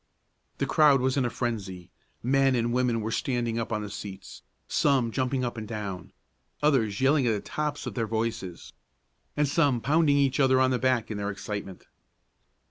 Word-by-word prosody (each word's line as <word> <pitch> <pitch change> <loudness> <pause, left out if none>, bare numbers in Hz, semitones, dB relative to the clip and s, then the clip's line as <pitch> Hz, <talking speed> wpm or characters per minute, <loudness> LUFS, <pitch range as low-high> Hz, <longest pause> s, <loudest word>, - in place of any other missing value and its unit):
The - - 0
crowd 150 -3 +5
was 130 0 +1
in 135 -3 +1
a - - 0
frenzy. 95 -8 -4 0.3
Men 135 +1 +3
and 120 0 0
women 125 -2 +1
were 110 +1 -3
standing 120 -2 -1
up 115 - -4
on 105 -1 -1
the 105 - -6
seats, 100 -2 -8 0.3
some 130 -5 +2
jumping 130 +1 -1
up 120 -1 -4
and 110 -1 -5
down, 100 -6 -6 0.5
others 120 -8 +2
yelling 135 -1 +3
at 115 - +3
the 105 - -1
tops 150 +5 -4
of - - -4
their 115 -3 -2
voices, 110 -5 -4 0.6
and 150 0 +3
some 140 -4 +2
pounding 145 +4 +3
each 140 -1 +2
other 130 -1 +4
on 130 0 +3
the 125 - +1
back 125 -3 +1
in 105 - -3
their 100 0 -2
excitement. 100 -1 -6
120 Hz, 185 wpm, -27 LUFS, 110-135 Hz, 0.6 s, crowd